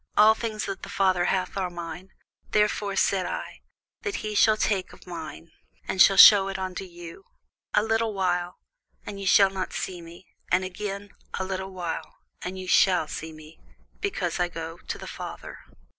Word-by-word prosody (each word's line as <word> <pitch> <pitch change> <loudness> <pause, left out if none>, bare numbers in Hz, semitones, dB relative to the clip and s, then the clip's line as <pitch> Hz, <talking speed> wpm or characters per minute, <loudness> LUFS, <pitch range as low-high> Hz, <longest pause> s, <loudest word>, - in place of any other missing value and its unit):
All 215 +1 +8
things 220 -2 -4
that 195 - -5
the - - -8
Father 185 -2 +2
hath 185 0 -1
are 190 -2 -1
mine: 175 +1 -8 0.4
therefore 210 -1 +1
said 190 -2 +1
I, - - -6 0.4
that 410 -3 -3
he 215 - -3
shall 215 +1 +4
take 195 -3 -1
of - - -16
mine, 165 -1 -8 0.4
and 185 - +1
shall 195 +1 +7
shew 195 -1 +10
it 195 -1 -3
unto 185 0 -4
you. 175 +1 -11 0.5
A 210 - +4
little 225 0 +1
while, 180 -3 -1 0.5
and 200 -1 -7
ye 195 - -4
shall 195 0 +6
not 190 -1 -4
see 180 -2 -4
me: 170 +2 -13 0.3
and 185 +1 +3
again, 200 +2 -5 0.2
a - - -2
little 190 0 -4
while, 180 -3 -5 0.3
and 185 +1 -5
ye 185 - -6
shall 180 -3 +4
see 160 +1 -6
me, 155 0 -14 0.4
because 190 - -2
I 175 - +2
go 165 0 -7
to - - -6
the - - -9
Father. - - -8
190 Hz, 180 wpm, -26 LUFS, 175-200 Hz, 0.5 s, shew